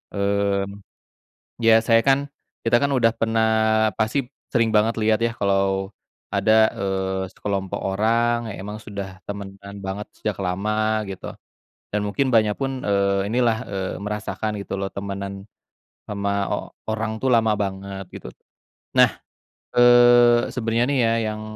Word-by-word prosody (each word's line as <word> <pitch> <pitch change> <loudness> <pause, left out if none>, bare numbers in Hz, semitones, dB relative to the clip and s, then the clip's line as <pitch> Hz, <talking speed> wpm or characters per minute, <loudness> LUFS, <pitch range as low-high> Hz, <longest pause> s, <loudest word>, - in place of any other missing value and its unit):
Mmm, 100 0 0 0.8
biasanya 115 0 +5
kan, 135 0 +5 0.5
kita 115 +1 +4
kan 140 - +2
udah 115 -2 +3
pernah 115 0 +2 0.5
pasti 110 +6 +1 0.3
sering 115 -2 +2
banget 110 +2 +3
lihat 110 0 +3
ya - - -1
kalau 95 0 0 0.4
ada, 110 - +3 0.2
eee, 95 -1 -2
sekelompok 95 -2 -3
orang 115 +4 +2 0.2
yang - - -9
emang 105 +1 -6
sudah 100 -2 -5 0.2
temanan 100 0 -8
banget 100 +2 -4
sejak 105 - -2
lama 100 +4 -1 0.4
gitu. - - -8 0.6
Dan 105 0 -1
mungkin 130 +5 0
Mbaknya 110 -2 +4
pun, 135 -1 -2 0.2
eee, 100 0 +1
inilah, 115 0 +2
eee, 95 -2 -3
merasakan 105 0 -3
gitu 100 -1 -5
loh 100 - -2
temenan 100 0 -5 0.6
sama 100 -1 -2 0.2
o - - +2 0.4
orang 110 0 -2
tuh 135 - 0
lama 115 -3 +4
banget 95 0 -4
gitu. - - -9 0.7
Nah, - - +7 0.7
eee, 120 -1 +6
sebenernya 115 -1 +1
nih 140 - +1
ya - - +2 0.2
yang 110 - -6
105 Hz, 135 wpm, -23 LUFS, 100-115 Hz, 0.8 s, Nah